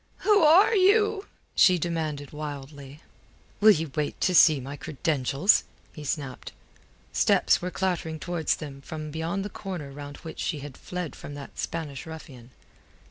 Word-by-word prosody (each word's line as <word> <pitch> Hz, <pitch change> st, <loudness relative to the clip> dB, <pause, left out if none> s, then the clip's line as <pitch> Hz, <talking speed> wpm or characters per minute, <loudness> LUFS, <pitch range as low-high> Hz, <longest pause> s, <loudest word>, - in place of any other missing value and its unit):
"Who 420 Hz, -2 st, +4 dB
are 335 Hz, +8 st, +6 dB
you?" 420 Hz, +1 st, +3 dB, 0.3 s
she 185 Hz, -1 st, +5 dB
demanded 155 Hz, -4 st, -3 dB
wildly. 145 Hz, -1 st, -8 dB, 0.6 s
"Will 215 Hz, +1 st, +7 dB
ye 165 Hz, -6 st, +4 dB
wait 150 Hz, 0 st, -3 dB
to 185 Hz, -, +2 dB
see 155 Hz, -4 st, +7 dB
my 135 Hz, +2 st, -7 dB
credentials?" 145 Hz, -, +1 dB, 0.3 s
he 150 Hz, -, -9 dB
snapped. 140 Hz, -2 st, -4 dB, 0.6 s
Steps -, -, +3 dB
were 180 Hz, -, -2 dB
clattering 175 Hz, -4 st, -2 dB
towards 175 Hz, -1 st, -1 dB
them 140 Hz, -3 st, -9 dB
from 155 Hz, +1 st, -7 dB
beyond 165 Hz, +5 st, -3 dB
the -, -, -4 dB
corner 175 Hz, -8 st, -6 dB
round 145 Hz, 0 st, -9 dB
which 160 Hz, -, -9 dB
she 150 Hz, -5 st, -2 dB
had 140 Hz, -2 st, -9 dB
fled 180 Hz, -3 st, -6 dB
from 145 Hz, -, -9 dB
that 140 Hz, -1 st, -10 dB
Spanish 160 Hz, -1 st, -5 dB
ruffian. 135 Hz, -7 st, -10 dB
155 Hz, 150 wpm, -26 LUFS, 145-180 Hz, 0.6 s, Will